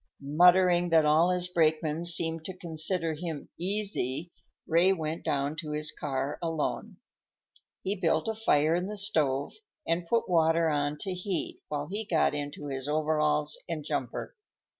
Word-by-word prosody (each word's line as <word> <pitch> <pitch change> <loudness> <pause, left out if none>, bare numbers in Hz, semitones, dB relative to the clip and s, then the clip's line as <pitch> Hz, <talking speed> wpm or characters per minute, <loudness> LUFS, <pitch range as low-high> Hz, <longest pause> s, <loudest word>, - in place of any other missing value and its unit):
Muttering 175 +4 +4
that 160 -2 +4
all 155 +4 +4
his 180 0 0
brakemen 160 -1 +1
seemed 165 -1 +2
to 185 -1 -7
consider 165 0 -1
him 160 -1 -6
"easy," 180 -6 -1 0.3
Ray 170 +4 +4
went 160 -2 -4
down 140 +1 -1
to 155 -2 -4
his 150 0 +1
car 135 -1 -3
alone. 170 +5 -3 0.9
He 195 +2 -1
built 160 -1 +1
a 225 - 0
fire 160 -8 +2
in 180 +2 0
the 210 +1 -5
stove 150 -9 +1 0.3
and 170 +1 0
put 230 +5 +1
water 165 -1 +3
on 145 0 -1
to 190 - -3
heat 180 0 -3
while 145 -1 -3
he 205 +4 -3
got 175 -9 +2
into 145 0 -5
his 135 -1 -3
overalls 150 0 +1
and 155 -3 -4
jumper. - - -4
165 Hz, 155 wpm, -29 LUFS, 150-180 Hz, 0.9 s, Muttering